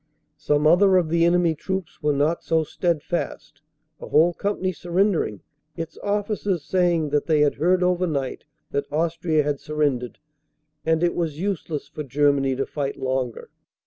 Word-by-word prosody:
Some 150 0 +1
other 185 +4 +6
of 170 -3 +1
the 165 +1 +3
enemy 170 -1 +3
troops 190 +2 -5
were 150 -1 +2
not 145 +4 0
so 160 -1 +1
steadfast, 160 -3 -3 0.4
a - - -8
whole 165 +3 +4
company 200 0 -1
surrendering, 175 - 0 0.4
its 165 -1 -5
officers 205 -5 -1
saying 175 -5 +1
that 145 0 0
they 155 -2 +3
had 145 -1 +3
heard 180 +3 +2
over 180 0 +2
night 140 -5 -3 0.3
that 140 0 -2
Austria 160 0 +1
had 145 -1 -1
surrendered 145 -5 -1 0.7
and 160 +1 +2
it 175 - +2
was 160 -3 -2
use 195 -3 -2
less 150 -3 -4
for 155 - -7
Germany 140 -1 +2
to 135 - -1
fight 140 -2 -4
longer. 130 -2 -3
160 Hz, 160 wpm, -23 LUFS, 145-175 Hz, 0.7 s, other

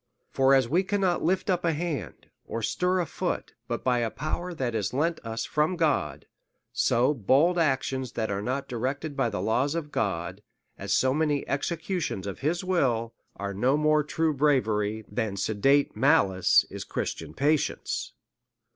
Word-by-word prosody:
For 135 0 +4
as 130 -3 +3
we 170 +9 +2
cannot 190 -2 0
lift 185 +3 +1
up 180 -2 +1
a 165 -1 +2
hand^ 150 - -4 0.2
or 115 0 -4
stir 180 - +1
a - - -1
foot, - - -3
but - - -3
by 125 -1 +2
a 115 -1 0
power 155 +8 -4
that 130 -8 -2
is 110 +2 -2
lent 160 +4 0
us 115 0 -3
from 155 +4 +1
God; 145 - 0 0.5
so 125 +5 +2
bold 145 - +3
actions 130 -4 0
that 110 -2 -2
are 100 0 -2
not 130 +5 -2
directed 135 +5 -3
by 135 -4 +1
the 105 - -3
laws 130 +7 +1
of 150 -3 -4
God, 90 - -2 0.4
or - - -6
so 130 0 +2
many 150 -1 0
executions 160 - -2
of 100 - -5
his 165 +6 -1
will, 125 -11 0 0.2
are 100 0 -4
no 125 +8 +2
more 150 0 +3
true 160 +1 0
bravery, 110 -7 +1
than 105 -2 -3
sedate 135 +9 +2
malice 100 - +4
is - - -5
Christian - - -4
patience. 150 +2 0
135 Hz, 165 wpm, -27 LUFS, 115-160 Hz, 0.5 s, For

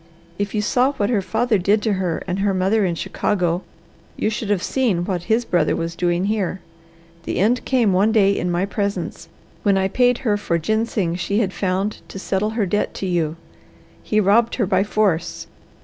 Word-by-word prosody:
If 205 +1 -2
you 210 - 0
saw 255 +5 +2
what 210 -4 -1
her 210 -5 +2
father 220 +2 +1
did 205 +4 +2
to 220 - +1
her 185 -4 -2
and 185 +1 -2
her 195 -1 +1
mother 195 +4 +2
in 175 -2 -1
Chicago, 175 0 -1 0.6
you 215 - 0
should 215 -1 -4
have 200 -4 +1
seen 215 -10 0
what 180 -3 -3
his 230 +2 +2
brother 170 -4 +1
was 165 0 -3
doing 175 +1 0
here. 200 -3 -1 0.7
The - - -2
end 230 +6 +2
came 240 -7 +2
one 200 +4 +3
day 200 -3 +4
in 180 - -1
my 175 +2 0
presence, 200 0 -3 0.3
when 200 -2 +3
I 190 0 +2
paid 245 +4 +2
her 210 -3 +2
for 175 -4 -1
ginseng 215 -1 0
she 200 +3 -1
had 200 -4 0
found 195 +2 -1
to - - -9
settle 195 +2 -1
her 215 - +2
debt 205 +3 -1
to - - -4
you. 165 -4 0 0.7
He 215 - 0
robbed 215 +4 +3
her 230 - +1
by 190 0 +2
force. 195 -5 0
200 Hz, 195 wpm, -21 LUFS, 185-215 Hz, 0.7 s, day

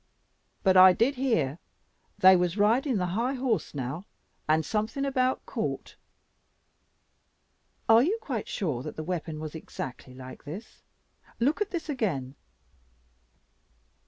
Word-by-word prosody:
But 190 -2 +4
I 185 0 +9
did 235 +8 +2
hear 175 - 0 0.6
they 190 0 +8
was 180 +1 0
riding 230 +5 +3
the 180 - 0
high 245 +6 0
horse 250 - -1
now, 140 +8 -4 0.4
and 155 0 +3
something 220 +6 -1
about 260 -2 0
court." - - -4 1.9
"Are 225 +1 +7
you 370 - +1
quite 450 - -4
sure 150 - -2
that - - -7
the 155 - -5
weapon 160 -2 -4
was 155 -1 -6
exactly 130 -5 -8
like 130 0 -10
this? 180 +10 -9 0.6
Look 285 - +1
at 420 - 0
this 345 -3 -4
again." 180 - -2
195 Hz, 130 wpm, -28 LUFS, 155-255 Hz, 1.9 s, I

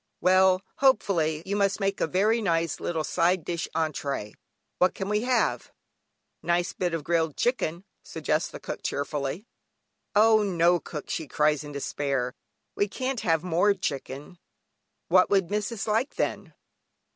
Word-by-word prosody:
"Well," 185 0 +4
hopefully, 170 - +2
"you 200 +1 -2
must 200 -1 +1
make 195 -1 -1
a - - +2
very 210 +7 +2
nice 165 -5 0
little 160 -2 -2
side 175 +1 +1
dish 170 -1 -3
(entrée), 140 -9 -2 0.5
what 180 - +3
can 195 0 -4
we 210 0 +1
have?" 250 +1 0 0.7
"Nice 175 +1 0
bit 175 -2 -1
of 160 - -4
grilled 165 -2 0
chicken," 195 -8 -1 0.2
suggests - - -2
cook - - -5
cheerfully. 145 +6 -3 0.7
"Oh 220 +1 +6
no 175 -3 +3
cook," 150 -3 -7
she 160 - -3
cries 150 +1 +1
in 145 - -8
despair, 140 -3 -2 0.4
"we 205 - +1
can't 255 +4 -3
have 165 -4 +1
more 180 +4 +2
chicken." 145 -1 -5 0.7
"What 185 +1 +5
would 195 -3 +2
missis 210 +1 -2
like 225 +5 0
then?" - - -3
175 Hz, 145 wpm, -27 LUFS, 155-200 Hz, 0.7 s, Oh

